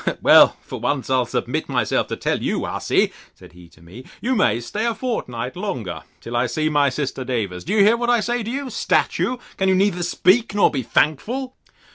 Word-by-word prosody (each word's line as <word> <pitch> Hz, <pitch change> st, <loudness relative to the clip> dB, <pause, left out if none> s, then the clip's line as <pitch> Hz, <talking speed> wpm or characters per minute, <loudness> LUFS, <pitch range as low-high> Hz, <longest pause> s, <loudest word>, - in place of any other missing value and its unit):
—Well, -, -, +6 dB
for -, -, -8 dB
once, 135 Hz, -2 st, -2 dB
I'll 130 Hz, -2 st, +2 dB
submit -, -, -3 dB
myself -, -, 0 dB
to -, -, -4 dB
tell -, -, -1 dB
you, -, -, -1 dB
hussy, -, -, 0 dB, 0.2 s
said -, -, -16 dB
he 90 Hz, -1 st, -15 dB
to 85 Hz, -, -21 dB
me, 95 Hz, +10 st, -12 dB, 0.2 s
you 255 Hz, +6 st, -1 dB
may 205 Hz, -, +2 dB
stay 205 Hz, -, -4 dB
a 230 Hz, -, -1 dB
fortnight 125 Hz, -, -4 dB
longer, 175 Hz, -, -4 dB, 0.2 s
till 120 Hz, -, -6 dB
I 120 Hz, +1 st, +1 dB
see 155 Hz, +6 st, -1 dB
my 145 Hz, -2 st, +3 dB
sister 135 Hz, 0 st, -3 dB
Davers: 110 Hz, -8 st, -3 dB
Do 185 Hz, -, -3 dB
you 210 Hz, -2 st, +5 dB
hear 220 Hz, +3 st, +4 dB
what 240 Hz, 0 st, -1 dB
I 240 Hz, -1 st, +4 dB
say 240 Hz, +2 st, -1 dB
to 220 Hz, -, -5 dB
you, 270 Hz, +1 st, -4 dB
statue? 255 Hz, -, 0 dB, 0.2 s
Can 190 Hz, 0 st, +1 dB
you 190 Hz, -, +4 dB
neither 190 Hz, -2 st, +1 dB
speak 195 Hz, +5 st, +2 dB
nor 205 Hz, -, +4 dB
be 135 Hz, -, -2 dB
thankful? 210 Hz, -, -1 dB
170 Hz, 210 wpm, -21 LUFS, -, 0.2 s, Well